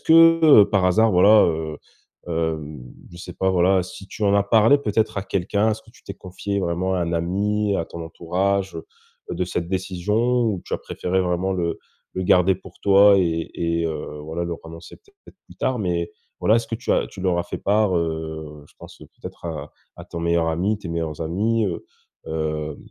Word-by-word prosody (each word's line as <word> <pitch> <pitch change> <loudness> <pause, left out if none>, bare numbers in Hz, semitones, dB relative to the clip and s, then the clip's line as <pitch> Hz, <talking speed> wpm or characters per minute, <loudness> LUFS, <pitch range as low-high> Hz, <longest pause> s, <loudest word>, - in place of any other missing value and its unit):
que, 165 -7 +7
par 100 -2 +1
hasard, 110 +5 +4
voilà, 105 +4 +6
heu, 80 -2 -3 0.5
hem, 80 -4 -3 0.3
je 85 - -13
sais 85 - -9
pas, 95 - 0
voilà, 95 +1 +3
si 95 +2 -10
tu 110 - -9
en 100 -1 +3
as 100 - +4
parlé 115 +5 +5
peut-être 110 -4 -1
à - - -2
quelqu'un. 100 +3 0
Est-ce 110 +1 -4
que 115 - -20
tu - - -22
t'es 100 - -7
confié 100 +1 -4
vraiment 90 +2 -1
à 90 - 0
un 85 0 -2
ami, 100 +4 0
à 85 - -1
ton 85 - -8
entourage, 95 +4 -2
heu, - - -8 0.4
de 90 - -1
cette 90 -1 -3
décision 105 +7 0
ou 105 -6 -1
tu - - -3
as - - -3
préféré 95 +1 -2
vraiment 90 +2 -1
le 85 -3 -2 0.4
le 95 - -2
garder 90 +1 +4
pour 95 - -15
toi 100 0 +6
et 85 -2 -1
et 85 0 -1
heu, 75 -1 -5
voilà 80 +2 -4
leur 85 -1 -4
annoncer, 80 0 -11
peut-être, 405 -1 -21
plus - - -16
tard? 130 -2 -1
Mais 85 -3 -2 0.3
voilà, 110 - +4
est-ce 115 -1 -1
que 115 - -4
tu 120 - -5
as - - +1
tu 95 - -11
leur 90 -2 +1
as 85 - +1
fait 90 - -6
part, 105 -2 +2
heu, 80 -2 -4
je - - -25
pense, - - -13
peut-être, - - -12
à 75 -3 -6 0.3
à - - -10
ton 85 - -8
meilleur 85 -1 +1
ami, 95 +6 0
tes 95 - -8
meilleurs 80 -2 -4
amis, 105 +7 0
heu, 85 - -4 0.4
hem, 75 -1 -3
90 Hz, 205 wpm, -22 LUFS, 85-105 Hz, 0.5 s, que